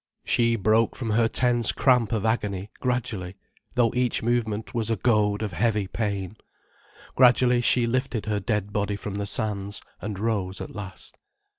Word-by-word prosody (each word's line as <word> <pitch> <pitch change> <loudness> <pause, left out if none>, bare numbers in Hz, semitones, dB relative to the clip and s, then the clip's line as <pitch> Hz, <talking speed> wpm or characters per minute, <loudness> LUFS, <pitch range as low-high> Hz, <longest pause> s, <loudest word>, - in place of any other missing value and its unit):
She 115 -1 +3
broke 110 +2 +2
from 115 -4 -3
her 115 +1 +3
tense 120 -1 +3
cramp 125 -5 +2
of 110 -2 -1
agony 105 -3 -1
gradually, 110 -7 -2 0.4
though 120 -2 +2
each 125 -2 0
movement 110 -2 -1
was 115 -2 -1
a 115 - +2
goad 105 -1 +1
of 105 - -3
heavy 105 +1 0
pain. 100 -1 -3 0.8
Gradually, 125 -1 +4
she 120 0 +3
lifted 125 -2 -1
her 105 -1 -1
dead 105 0 -2
body 105 0 -1
from 100 -1 -6
the 100 0 -3
sands, 100 -2 -1 0.2
and 105 -2 -5
rose 100 -3 -2
at - - -7
last. 95 -4 -9
110 Hz, 160 wpm, -25 LUFS, 100-120 Hz, 0.8 s, Gradually